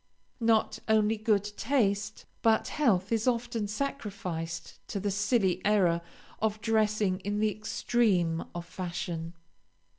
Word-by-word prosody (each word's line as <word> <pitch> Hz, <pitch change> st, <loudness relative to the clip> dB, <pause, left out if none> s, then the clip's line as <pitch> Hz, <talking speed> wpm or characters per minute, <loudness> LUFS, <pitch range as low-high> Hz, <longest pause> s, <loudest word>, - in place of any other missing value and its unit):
Not 225 Hz, -1 st, +2 dB
only 220 Hz, 0 st, +3 dB
good 215 Hz, -2 st, +2 dB
taste, 210 Hz, -7 st, 0 dB, 0.2 s
but 220 Hz, -1 st, +3 dB
health 210 Hz, -10 st, +2 dB
is 225 Hz, +1 st, +1 dB
often 235 Hz, -3 st, 0 dB
sacrificed 200 Hz, -9 st, -4 dB
to 200 Hz, -, -3 dB
the 200 Hz, +1 st, -1 dB
silly 200 Hz, -1 st, +1 dB
error 185 Hz, -5 st, +3 dB, 0.4 s
of 215 Hz, -1 st, 0 dB
dressing 215 Hz, -3 st, +1 dB
in 205 Hz, +2 st, -2 dB
the 215 Hz, 0 st, +2 dB
extreme 200 Hz, -6 st, +1 dB
of 175 Hz, 0 st, -4 dB
fashion. 175 Hz, -2 st, -5 dB
210 Hz, 120 wpm, -29 LUFS, 185-220 Hz, 0.4 s, only